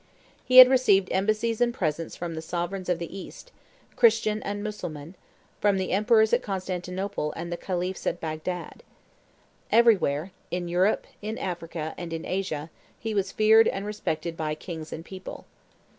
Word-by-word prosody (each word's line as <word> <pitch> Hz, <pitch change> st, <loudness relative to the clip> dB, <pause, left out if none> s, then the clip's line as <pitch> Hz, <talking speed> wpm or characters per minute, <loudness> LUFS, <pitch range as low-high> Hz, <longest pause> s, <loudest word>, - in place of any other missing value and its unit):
He 255 Hz, -, +3 dB
had 255 Hz, 0 st, +13 dB
received 230 Hz, -8 st, +3 dB
embassies 215 Hz, +4 st, 0 dB
and 240 Hz, 0 st, +3 dB
presents 165 Hz, -, -3 dB
from 170 Hz, -1 st, -5 dB
the 160 Hz, -, -5 dB
sovereigns 175 Hz, +3 st, -4 dB
of 180 Hz, -, +2 dB
the 170 Hz, +2 st, -7 dB
East, 195 Hz, -, -10 dB, 0.4 s
Christian 220 Hz, -2 st, +3 dB
and 205 Hz, 0 st, -4 dB
Mussulman, 170 Hz, -7 st, -6 dB, 0.5 s
from 205 Hz, -2 st, +3 dB
the 190 Hz, -1 st, -2 dB
emperors 220 Hz, +2 st, +3 dB
at -, -, +4 dB
Constantinople 185 Hz, -2 st, -3 dB
and 170 Hz, +1 st, -6 dB
the -, -, -1 dB
khalifs 180 Hz, +1 st, -3 dB
at 175 Hz, -, -1 dB
Bagdad. 160 Hz, +3 st, -5 dB, 0.9 s
Everywhere, 195 Hz, -8 st, +3 dB, 0.2 s
in 175 Hz, 0 st, -3 dB
Europe, 180 Hz, +4 st, +1 dB, 0.2 s
in 215 Hz, +2 st, -4 dB
Africa, 165 Hz, -3 st, -4 dB
and 170 Hz, -2 st, -6 dB
in 165 Hz, -, -4 dB
Asia, 165 Hz, -5 st, -3 dB, 0.3 s
he 225 Hz, -1 st, -4 dB
was 200 Hz, -2 st, 0 dB
feared 220 Hz, +1 st, +5 dB
and 195 Hz, +1 st, -2 dB
respected 170 Hz, -5 st, -3 dB
by 155 Hz, -1 st, -2 dB
kings 160 Hz, -1 st, -8 dB
and 165 Hz, -, -7 dB
people. 190 Hz, +1 st, -9 dB
185 Hz, 160 wpm, -26 LUFS, 170-210 Hz, 0.9 s, had